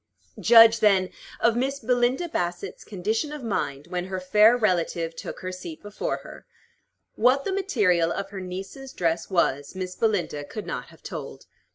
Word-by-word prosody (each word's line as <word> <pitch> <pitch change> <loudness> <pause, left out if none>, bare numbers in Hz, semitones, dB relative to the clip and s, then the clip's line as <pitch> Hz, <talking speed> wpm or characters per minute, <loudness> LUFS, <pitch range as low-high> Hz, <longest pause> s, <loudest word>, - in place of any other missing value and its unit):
Judge, 230 -1 +7
then, 195 -3 +3 0.3
of 235 -1 +3
Miss 270 +3 0
Belinda 250 +6 +1
Bassett's 175 - -4
condition 215 - -2
of 300 -3 -7
mind 145 -10 -2
when 180 0 -3
her 190 0 -4
fair 210 +6 +5
relative 170 -6 0
took - - -7
her 185 - -4
seat 175 -4 -8
before 205 0 -3
her. - - -12 0.7
What 255 +5 +3
the 385 - -1
material 205 - +2
of 195 0 -4
her 195 -2 -6
niece's 195 +9 -7
dress 165 -1 -1
was, 145 -5 0
Miss 185 -1 -5
Belinda 200 -9 0
could 210 +9 -7
not - - -5
have - - -19
told. - - -7
195 Hz, 165 wpm, -25 LUFS, 180-235 Hz, 0.7 s, Judge